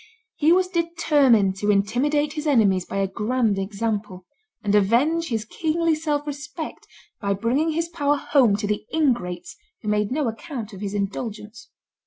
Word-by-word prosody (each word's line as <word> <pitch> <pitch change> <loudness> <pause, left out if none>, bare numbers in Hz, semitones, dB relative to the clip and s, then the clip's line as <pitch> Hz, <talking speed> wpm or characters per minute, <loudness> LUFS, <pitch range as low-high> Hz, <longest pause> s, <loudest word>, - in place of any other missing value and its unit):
He 315 +1 +3
was 365 +1 +4
determined 295 - +2
to 205 +1 -1
intimidate 260 +9 +1
his 305 0 -4
enemies 200 -10 +3
by - - -5
a 195 0 +1
grand 215 +1 0
example, 200 -2 -3 0.4
and 205 -2 0
avenge 250 +12 +3
his 225 -4 -2
kingly 325 +6 0
self 300 -2 -1
respect 295 +2 -7 0.3
by 200 -1 0
bringing 265 +10 0
his 330 +1 -1
power 295 -4 0
home 255 -7 +3
to 205 +1 -3
the 210 0 -1
ingrates 235 - -1 0.3
who 210 - -2
made 210 0 +1
no 290 0 0
account 230 -2 -6
of 190 - -9
his 205 0 -3
indulgence. 210 +2 -5
235 Hz, 160 wpm, -23 LUFS, 205-300 Hz, 0.4 s, was